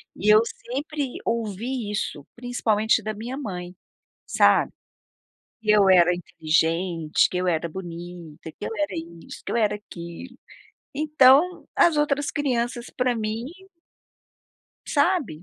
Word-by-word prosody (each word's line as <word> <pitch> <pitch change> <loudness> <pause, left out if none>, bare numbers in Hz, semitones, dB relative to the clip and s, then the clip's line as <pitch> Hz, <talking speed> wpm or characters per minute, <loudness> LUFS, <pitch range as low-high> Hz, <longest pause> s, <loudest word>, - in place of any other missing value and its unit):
E 205 - -4
eu 215 - +7
sempre 285 +5 -4 0.2
ouvi 230 +1 -2
isso, 205 -8 -3
principalmente 225 -3 +1
da 215 0 -4
minha 235 +5 -6
mãe, 180 -9 -6 0.5
sabe. - - +3 0.9
Que 215 -1 +2
eu 200 -2 +5
era 180 -1 +6
inteligente, 165 0 +1
que - - -5
eu 180 0 0
era 170 -1 0
bonita, 175 -2 -9
que 205 - -9
eu - - -2
era 200 0 -1 0.3
isso, - - -10
que - - -5
eu - - 0
era 215 -3 +2
aquilo. 205 +5 -10 0.6
Então, 305 +3 +4
as 335 -3 +4
outras 290 -1 +1
crianças, 240 -4 -1
pra 250 -1 +1
mim 220 +1 -3 1.4
sabe, 285 - +1
215 Hz, 130 wpm, -24 LUFS, 180-255 Hz, 1.4 s, eu